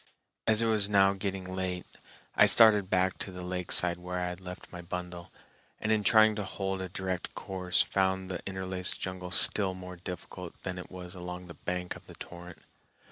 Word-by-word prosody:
As 110 +1 +4
it - - +3
was 105 -3 +3
now 100 -1 +5
getting 95 -1 -3
late, 95 -1 -3 0.5
I - - +7
started 105 -4 +7
back 95 0 +2
to 95 - -5
the 90 0 -7
lakeside 90 -1 +1
where 90 0 -3
I 90 0 -1
had 90 +1 -7
left 90 0 -9
my 90 - -7
bundle, 90 0 -6 0.5
and 110 - 0
in 110 -1 +3
trying 110 +1 +6
to 105 - -1
hold 95 0 -2
a 95 - -4
direct 95 0 -3
course 95 -2 0
found 95 -1 +1
the 90 -2 -4
interlaced 95 -1 -2
jungle 95 -1 -4
still 95 +1 +2
more 90 -1 -8
difficult 90 0 -7
than 90 -1 -3
it 90 - -8
was 90 -1 -8
along 90 0 -6
the 85 - -9
bank 90 0 -3
of - - -13
the - - -9
torrent. 90 0 -9
95 Hz, 190 wpm, -30 LUFS, 90-95 Hz, 0.5 s, I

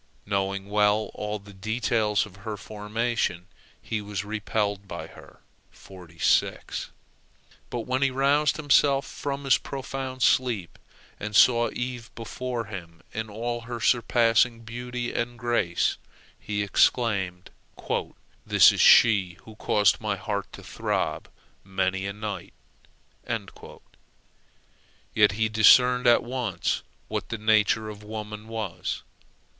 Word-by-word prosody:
Knowing 100 0 -2
well 105 +1 +2
all 105 0 -4
the 100 0 -14
details 110 0 0
of 90 - -15
her 105 +1 -6
formation, 105 -3 -2 0.3
he 110 -1 -4
was 105 0 -5
repelled 105 -1 -2
by 85 -3 -6
her. - - -16 2.3
But 120 - -3
when 130 +3 -2
he 135 - +4
roused 140 +3 +2
himself 140 -2 +3
from 140 0 -5
his 135 -2 +4
profound 135 -1 -5
sleep, 115 -9 +1 0.4
and 105 0 -5
saw 120 +2 +5
Eve 120 -2 -5
before 120 0 -4
him 85 -5 -9
in 110 0 -4
all 120 +3 -3
her 120 +1 -6
surprising 115 0 +3
beauty 120 +1 -5
and 120 +1 -3
grace, 120 -8 0 0.4
he 105 -1 -2
exclaimed, 95 -4 +1 0.9
"This - - +6
is - - -1
she 100 -7 +6
who 110 - -13
caused 105 -1 +2
my 105 -2 -1
heart 100 0 -4
to - - -10
throb - - -2 0.3
many 95 0 -1
a 100 - -4
night!" 105 -3 -6 2.6
Yet 105 -1 +4
he 110 +2 +1
discerned 125 +3 +5
at 120 - +5
once 120 -8 -2 0.3
what - - -4
the 115 - -3
nature 110 0 +2
of 105 -1 -8
woman 105 0 -7
was. 110 -6 -4
110 Hz, 120 wpm, -26 LUFS, 100-120 Hz, 2.6 s, This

